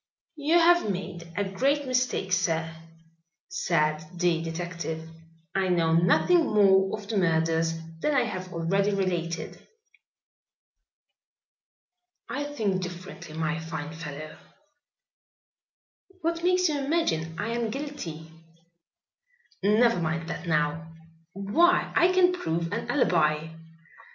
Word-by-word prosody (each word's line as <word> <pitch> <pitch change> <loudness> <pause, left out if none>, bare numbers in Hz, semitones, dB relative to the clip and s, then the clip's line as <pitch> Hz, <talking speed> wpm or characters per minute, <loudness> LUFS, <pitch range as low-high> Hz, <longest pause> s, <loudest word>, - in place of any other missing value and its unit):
"You 305 +3 +3
have 345 -7 +5
made 175 -3 -5
a 205 - +2
great 270 +10 0
mistake, 250 -7 0
sir," 165 -3 0 0.7
said 155 - 0
the 175 -2 +1
detective. 165 -1 -5 0.5
"I 195 -1 +1
know 165 -2 +2
nothing 180 - +4
more 195 -4 +4
of 205 -2 -11
the 215 0 -1
murders 165 -2 +2 0.3
than 300 - +1
I 255 - +4
have 185 -5 -5
already 195 +5 +1
related." 175 -3 -3 2.6
"I 285 +2 -3
think 215 -10 -1
differently, 175 -3 -8
my 160 0 -1
fine 160 -2 -6
fellow." 155 -1 -8 1.8
"What 335 +1 -1
makes 365 0 +3
you 300 -2 -1
imagine 165 - 0
I 205 +5 -2
am 235 -1 -1
guilty?" 215 - -6 1.3
"Never 215 +1 +4
mind 165 0 -2
that 175 - -5
now." 160 +1 0 0.4
"Why, 320 - +2
I 355 +1 +5
can 365 -1 +4
prove 165 - -2
an 230 - -4
alibi." 160 - +2
185 Hz, 110 wpm, -27 LUFS, 165-250 Hz, 2.6 s, have